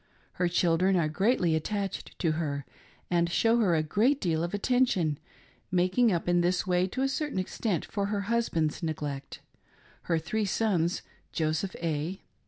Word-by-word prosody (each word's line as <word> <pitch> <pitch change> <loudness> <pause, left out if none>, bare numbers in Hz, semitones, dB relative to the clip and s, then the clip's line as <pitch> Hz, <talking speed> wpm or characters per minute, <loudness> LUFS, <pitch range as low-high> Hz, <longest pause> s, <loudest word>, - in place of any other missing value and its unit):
Her 180 - 0
children 175 +2 +2
are 170 -4 +2
greatly 180 +1 +2
attached 195 +4 -3
to 165 - +1
her, 145 -3 -2 0.5
and 170 -1 +2
show 230 +6 +3
her 190 -7 +3
a 155 - +2
great 230 - +2
deal 165 -4 0
of 170 - -2
attention, 205 - +1 0.5
making 185 +6 +3
up 170 -2 -1
in 175 0 +3
this 180 +1 +1
way, 180 0 +2
to 255 +7 -2
a - - +3
certain 295 -2 -2
extent, 185 -1 -1
for 200 -2 -2
her 205 0 -1
husband's 195 -8 0
neglect; 145 -4 -4 0.7
her 165 - +3
three 190 +7 -1
sons, 180 -4 0 0.3
Joseph 160 +3 -1
A. 165 +3 -2
180 Hz, 160 wpm, -29 LUFS, 160-205 Hz, 0.7 s, show